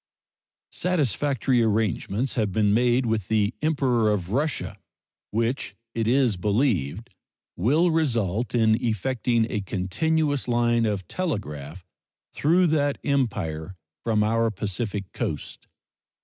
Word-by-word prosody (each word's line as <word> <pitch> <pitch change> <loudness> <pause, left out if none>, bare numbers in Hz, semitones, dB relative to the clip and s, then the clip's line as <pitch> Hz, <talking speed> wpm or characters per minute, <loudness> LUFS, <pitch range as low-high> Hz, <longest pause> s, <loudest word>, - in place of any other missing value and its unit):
Satisfactory 140 - +1
arrangements 110 - 0
have 110 -4 0
been 105 +1 +2
made 120 +2 +3
with 110 -5 -1
the 110 0 +1
Emperor 130 -8 +2
of 95 -3 -1
Russia, 145 +5 -1 0.5
which, 115 -1 -1 0.2
it 115 -1 -1
is 125 -4 +3
believed, 105 - 0 0.4
will 150 - +3
result 120 - 0
in 110 +1 +3
effecting 115 +1 +1
a 105 - -1
continuous 145 - 0
line 120 -1 +2
of 100 -4 -2
telegraph 90 - -4 0.5
through 175 +5 +3
that 145 -3 +1
Empire 95 - -1 0.3
from 110 -2 +2
our 115 +1 +2
Pacific 100 -1 -4
coast. - - -4
115 Hz, 110 wpm, -25 LUFS, 100-135 Hz, 0.5 s, made